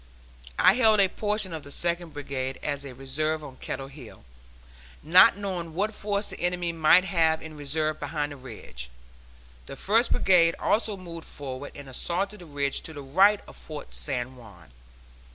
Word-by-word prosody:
I - - +6
held 220 -2 +5
a 195 - +7
portion 210 -3 -1
of 160 - -5
the 140 - -12
Second 170 0 -2
Brigade 135 -2 -4
as 145 -1 -2
a 135 -3 -8
reserve 155 +4 -1
on 130 -3 -10
Kettle 135 0 -5
Hill, 135 - -13 0.8
not 180 +6 +7
knowing 180 -5 -4
what 210 +4 0
force 205 0 -2
the - - -9
enemy 175 -1 0
might 165 +2 +5
have 165 -4 +2
in 160 -1 -9
reserve 155 +1 -1
behind 150 -2 -3
the - - -7
ridge. 105 - -10 0.8
The - - -7
First 225 - +2
Brigade 170 -3 +4
also 215 -1 +1
moved 170 -3 -9
forward 140 0 -7
and 140 -1 -10
assaulted 190 +9 -2
the 175 - -12
ridge 140 -1 -1
to 160 - -8
the 145 -2 -8
right 195 +9 +4
of - - -13
Fort 155 -2 -9
San 130 -2 -3
Juan. 95 - -15
160 Hz, 170 wpm, -27 LUFS, 140-185 Hz, 0.8 s, a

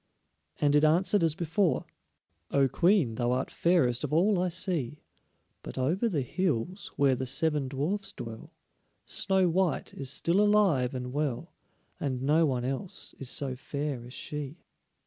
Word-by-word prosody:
And 145 0 +3
it 150 - +4
answered 180 +6 +3
as 165 -2 +2
before: 170 -2 0 0.6
"O 140 -1 +3
Queen, 170 - +2
thou 120 +1 0
art 130 +1 -2
fairest 155 -9 +2
of - - -3
all 180 +4 +3
I 185 - +1
see, 165 -6 -1 0.6
But - - -9
over 170 - +1
the 150 -9 -1
hills, 180 - -2
where 140 -2 +3
the 130 +1 -3
seven 145 +1 +1
dwarfs 185 +10 -2
dwell, 115 - -9 0.5
Snow 190 -1 +2
white 180 0 0
is 135 -2 -5
still 170 +7 +2
alive 195 -12 +3
and 125 0 -5
well, 145 -4 -2 0.5
And 130 -3 -2
no 155 +3 +3
one 125 -3 -1
else 135 +8 -4
is 135 - -4
so 135 -2 -1
fair 140 -1 -4
as 125 +1 -11
she." 150 +2 -6
150 Hz, 155 wpm, -29 LUFS, 130-180 Hz, 0.6 s, it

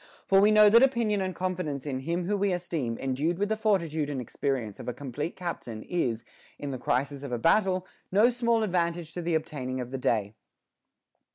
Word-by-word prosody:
For 195 0 +5
we 205 - +6
know 215 0 +7
that 230 +3 +7
opinion 235 -6 +2
and 185 -1 -2
confidence 180 -7 -3
in 135 -3 -2
him 170 +6 -2
whom 205 +2 0
we 200 0 +2
esteem 165 -10 -2
endued 140 +6 -1
with 205 +2 0
the 220 - +1
forti 210 -6 +1
tude 150 -1 -2
and 140 -3 -3
experience 125 -3 -3
of - - -8
a 125 - -3
complete 145 +4 -5
captain 145 -11 -5
is, 120 -10 -1 0.3
in 145 - -5
the 130 - -5
crisis 140 +3 -1
of 140 -2 -6
a 120 - 0
battle, 185 - +2 0.3
no 215 +6 +5
small 235 -2 +1
advantage 170 -4 -1
to 175 - -4
the 170 -1 0
obtaining 130 -5 -3
of 125 0 -5
the 135 - -3
day. 105 -4 0
165 Hz, 205 wpm, -28 LUFS, 135-195 Hz, 0.3 s, know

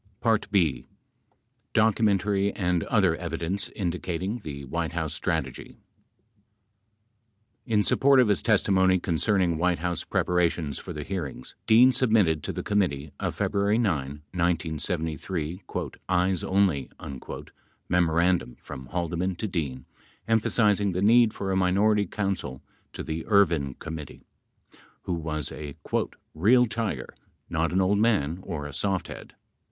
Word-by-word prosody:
b. 90 -8 +1 0.9
Documentary 100 -2 +2
and 90 -3 0
Other 95 -7 +3
Evidence 85 +3 -3
Indicating 90 +3 -3
the 70 -7 -7
White 65 - -3
House - - -2
Strategy - - -3 1.9
In 105 -3 +3
support 135 +4 +4
of 125 - +5
his 100 -7 +2
testimony 95 -1 +3
concerning 90 -1 +1
White 90 0 +2
House 85 0 -2
preparations 85 -5 0
for - - -8
the 75 - -5
hearings, 75 -8 -5
Dean 120 +4 +7
submitted 110 - +3
to - - -4
the - - -5
committee 80 -8 0
a - - -1
February 100 +2 +1
9, 75 - -1
1973, 85 0 -2 0.5
"Eyes 90 -1 +2
Only" 95 -9 +1 1.0
memorandum 85 -5 +2
from 65 -1 -10
Haldeman 90 +3 -2
to 110 - -3
Dean 70 -9 -3 0.4
emphasizing 105 -3 +2
the 90 +2 -1
need 115 +1 +6
for 100 -2 -4
a - - +1
minority 100 +2 +3
counsel 90 -10 -3 0.3
to - - -5
the 80 0 -4
Ervin 85 - +3
Committee 80 -4 -8 0.8
who 90 - -2
was 75 -3 -3
a 75 -2 -7 0.6
"real 115 +10 +5
tiger, 115 -1 -3 0.4
not 80 0 0
an 90 - +1
old 100 +2 +2
man 90 -8 +2
or 80 -6 -5
a 75 - -7
soft 95 -2 -1
head. - - -10
90 Hz, 125 wpm, -26 LUFS, 80-100 Hz, 1.9 s, Dean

